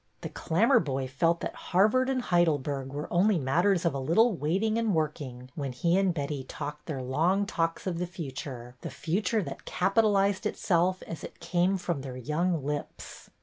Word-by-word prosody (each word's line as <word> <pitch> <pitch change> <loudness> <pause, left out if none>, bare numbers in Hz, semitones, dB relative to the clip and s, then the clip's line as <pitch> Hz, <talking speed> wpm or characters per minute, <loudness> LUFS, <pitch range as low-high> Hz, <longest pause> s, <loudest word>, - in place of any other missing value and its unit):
The - - -5
Clammerboy 160 - +2
felt 165 +5 +1
that - - -3
Harvard 215 +8 +2
and 255 -2 0
Heidel 175 -6 +3
berg 135 -1 -4
were 145 +2 -4
only 190 +3 +4
matters 170 +6 +2
of 170 - +2
a 135 - -2
little 210 - +3
waiting 195 +9 0
and 220 -5 +1
working 140 -5 -3
when 140 -4 -4
he 170 +7 +1
and 195 -1 +3
Betty 145 -3 -3
talked 145 +2 -7
their 135 -5 -3
long 170 +10 +1
talks 165 -3 -1
of 175 -3 -2
the 180 - -1
future, 135 -7 -7
the - - -5
Future 200 +6 -1
that 140 -4 -8
capitalized 200 +1 +2
itself 185 -2 +1
as 165 - -7
it - - -9
came 175 +3 +1
from 175 -5 -2
their 130 -2 -7
young 155 +5 -1
lips. 145 0 -5
170 Hz, 180 wpm, -28 LUFS, 140-190 Hz, -, only